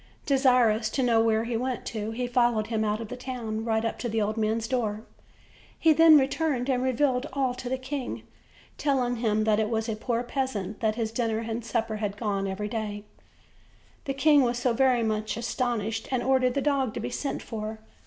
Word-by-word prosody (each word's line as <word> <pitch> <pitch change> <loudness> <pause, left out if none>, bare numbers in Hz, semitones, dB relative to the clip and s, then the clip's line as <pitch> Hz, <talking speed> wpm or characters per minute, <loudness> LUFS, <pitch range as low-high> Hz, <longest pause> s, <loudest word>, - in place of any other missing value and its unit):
Desirous 250 -6 +3
to 265 - -1
know 230 -2 +4
where 225 -1 +2
he 235 0 -3
went 250 +1 -2
to, 215 -2 -4
he 240 +3 -3
followed 240 -3 +2
him 220 -1 -1
out 210 0 0
of 225 -2 -6
the - - -5
town 240 -4 -4
right 225 0 0
up 225 - -3
to 240 - -2
the 225 0 0
old 215 0 0
man's 220 +1 0
door. 220 -4 -1 0.7
He 320 -1 +5
then 320 0 +8
returned 275 -1 0
and 250 -1 +1
revealed 260 +1 +1
all 265 -2 0
to 250 0 -6
the 260 - -1
king, 260 0 -5 0.6
telling 255 -4 +1
him 215 -2 +1
that 215 -1 +2
it 215 -1 0
was 225 -1 -1
to 225 - -2
a - - -2
poor 235 +2 -2
peasant 240 -6 -3
that 215 -1 +1
his 225 -2 -2
dinner 230 -1 -1
and 230 +1 -4
supper 225 -1 -2
had 205 -1 -3
gone 200 -3 -1
every 195 +2 -3
day. 225 - -3
OLD, 220 - -1
OLD 210 -1 -4
FAIRY 205 0 -16
TALES. - - -32
The 275 - -1
king 290 +1 +5
was 245 -1 0
very 255 -2 +3
much 215 0 -1
astonished, 230 -2 -2
and 255 -2 0
ordered 255 -1 +2
the 280 - +1
dog 275 -6 +1
to - - -2
be - - -4
sent 275 +3 -3
for. 220 -1 -5
235 Hz, 220 wpm, -27 LUFS, 220-255 Hz, 0.7 s, then